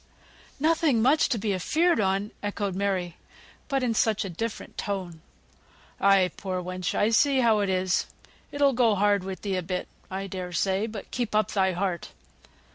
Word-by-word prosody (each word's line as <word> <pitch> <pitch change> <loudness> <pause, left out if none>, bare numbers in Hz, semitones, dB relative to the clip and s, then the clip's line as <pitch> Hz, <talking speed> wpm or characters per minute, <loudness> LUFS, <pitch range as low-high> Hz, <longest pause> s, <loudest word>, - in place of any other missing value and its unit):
"Nothing 310 -4 +3
much 270 +7 +3
to 245 - +1
be 205 -1 -1
afeared 320 - +2
on!" 195 +1 0
echoed 205 -1 -2
Mary, 185 -3 -2 0.5
but 275 -3 0
in 240 -2 +1
such 220 -1 +1
a 190 - -5
different 225 +6 -5
tone. 185 -6 -4 0.8
"Ay, 195 -2 +4
poor 185 -2 -3
wench, 180 0 -3
I 210 +2 +2
see 270 +3 +4
how 225 -3 +4
it 200 -1 0
is. 185 -1 +1 0.4
It'll 285 -1 +3
go 235 -3 +3
hard 200 -1 +2
with 190 0 -6
thee 195 -2 -1
a - - -1
bit, 180 +1 -4 0.2
I 190 +1 -4
dare 185 -2 -6
say; 195 +5 +1
but 215 -3 -8
keep 240 -4 -2
up 215 -2 +2
thy 190 -2 +2
heart. 180 -1 -2
200 Hz, 175 wpm, -26 LUFS, 185-230 Hz, 0.8 s, Ay